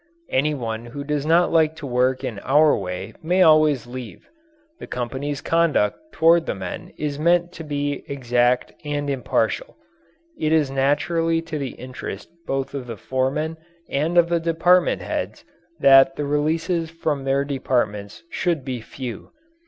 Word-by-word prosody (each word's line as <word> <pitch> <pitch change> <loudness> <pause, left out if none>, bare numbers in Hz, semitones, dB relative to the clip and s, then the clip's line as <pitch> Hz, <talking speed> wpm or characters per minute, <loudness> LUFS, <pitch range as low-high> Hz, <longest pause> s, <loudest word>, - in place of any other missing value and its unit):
Any 150 +3 +1
one 115 -2 -4
who 140 +4 -6
does 150 0 -2
not 170 +2 +4
like 160 -1 +3
to 155 - -8
work 130 0 +1
in 110 -4 -4
our 150 +6 +4
way 90 -2 -5
may 180 +3 +3
always 155 -6 +4
leave. 125 -2 -9 0.5
The - - -8
company's 130 +4 -4
conduct 165 -10 +2
toward 165 0 +4
the - - -1
men 95 -2 -7
is 145 -1 -3
meant 170 +2 +2
to 165 -2 -9
be 145 -2 -3
exact 125 -3 +1
and 145 -1 -2
impartial. 320 - -1 0.6
It 155 0 +1
is 150 -4 +2
naturally 165 +5 +1
to 160 -2 -5
the 135 -2 -4
interest 125 -5 -7 0.2
both 135 0 -2
of 135 -3 -5
the 115 -2 -6
foremen 130 +8 -1 0.3
and 155 +5 0
of 170 -1 +6
the 170 -1 +2
department 170 +2 +2
heads - - -4 0.3
that 135 0 +6
the 145 - -3
releases 160 +3 0
from 155 -4 -2
their 135 +1 +1
departments 120 -7 -2
should 170 -7 -1
be 130 -3 -4
few. 125 +1 -7
145 Hz, 155 wpm, -22 LUFS, 130-160 Hz, 0.6 s, of